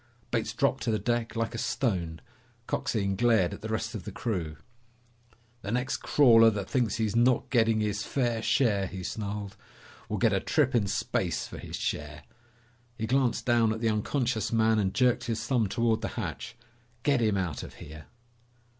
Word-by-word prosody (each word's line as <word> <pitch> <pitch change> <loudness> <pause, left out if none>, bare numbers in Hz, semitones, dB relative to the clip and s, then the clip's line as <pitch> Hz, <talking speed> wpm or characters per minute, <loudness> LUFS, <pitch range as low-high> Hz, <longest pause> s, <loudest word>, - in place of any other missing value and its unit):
Bates - - 0
dropped - - +1
to - - -1
the 110 - +2
deck 120 +3 -1
like 115 +1 -1
a 115 - -4
stone. 85 -13 -1 0.4
Coxine 100 -5 -1
glared 110 -5 +3
at - - -9
the - - -5
rest - - -2
of - - -6
the - - -7
crew. 85 -9 -3 1.0
"The 100 - -6
next 125 +2 -1
crawler 115 -5 +6
that 100 -3 -3
thinks 120 -5 0
he's 110 -1 -1
not 120 +1 +2
getting 115 -3 +3
his 105 -1 -1
fair 120 0 -1
share," 110 -4 +2
he 90 0 -7
snarled, 100 -1 -4 0.5
"will 105 - -1
get 110 +1 +3
a 95 - +2
trip 145 +5 +1
in 110 -5 +2
space 95 -3 -1
for - - -9
his - - -7
share!" 75 0 -4 0.7
He 110 - -2
glanced 130 0 +1
down 120 -2 +3
at 110 - -3
the 115 0 +1
unconscious 110 0 -1
man 110 -1 +3
and 95 -2 +1
jerked 125 +2 +2
his 115 -1 -2
thumb 120 -5 +1
toward 115 0 +1
the - - -2
hatch. - - -5 0.5
"Get 140 -4 +2
him 105 -3 +2
out 90 -5 -2
of - - -10
here!" 75 +1 -11
110 Hz, 180 wpm, -28 LUFS, 100-120 Hz, 1.0 s, crawler